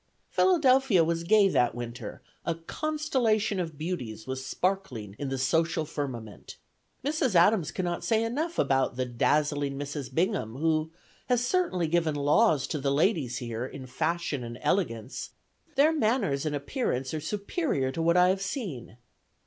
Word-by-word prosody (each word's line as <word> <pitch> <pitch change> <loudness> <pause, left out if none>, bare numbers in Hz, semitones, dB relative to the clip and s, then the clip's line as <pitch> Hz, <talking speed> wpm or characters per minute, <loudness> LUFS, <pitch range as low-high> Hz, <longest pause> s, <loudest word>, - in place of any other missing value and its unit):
Philadelphia 270 - +4
was 165 +1 -1
gay 205 +3 +5
that 125 -11 +2
winter: 120 -2 -7 0.2
a 165 - -1
"constellation 230 - 0
of 165 -4 -4
beauties" 130 -10 -4
was 130 0 -4
sparkling 135 - -2
in 140 - -3
the 135 - -2
social 160 +4 +1
firmament. 130 -8 -6 0.5
Mrs. 280 -7 0
Adams 175 0 +4
cannot 175 -2 -3
say 225 -1 +2
enough 305 +9 -2
about 135 -2 +2
"the 130 0 -1
dazzling 145 +3 +1
Mrs. 145 -1 -5
Bingham," 165 - 0
who 155 +2 +1 0.4
"has 245 -1 +2
certainly 245 - +1
given 165 -2 +1
laws 145 - +3
to 150 - -3
the 140 0 0
ladies 140 - +1
here, 120 -1 -4
in 130 +1 -7
fashion 155 0 -2
and 120 0 -7
elegance: 135 - -1 0.4
their 295 +4 +5
manners 215 - +1
and 150 - -1
appearance 140 - -2
are 155 - -2
superior 200 - -1
to 165 - -3
what 170 +2 +3
I 180 0 +6
have 190 +1 0
seen." 185 - -5
160 Hz, 150 wpm, -28 LUFS, 135-205 Hz, 0.5 s, I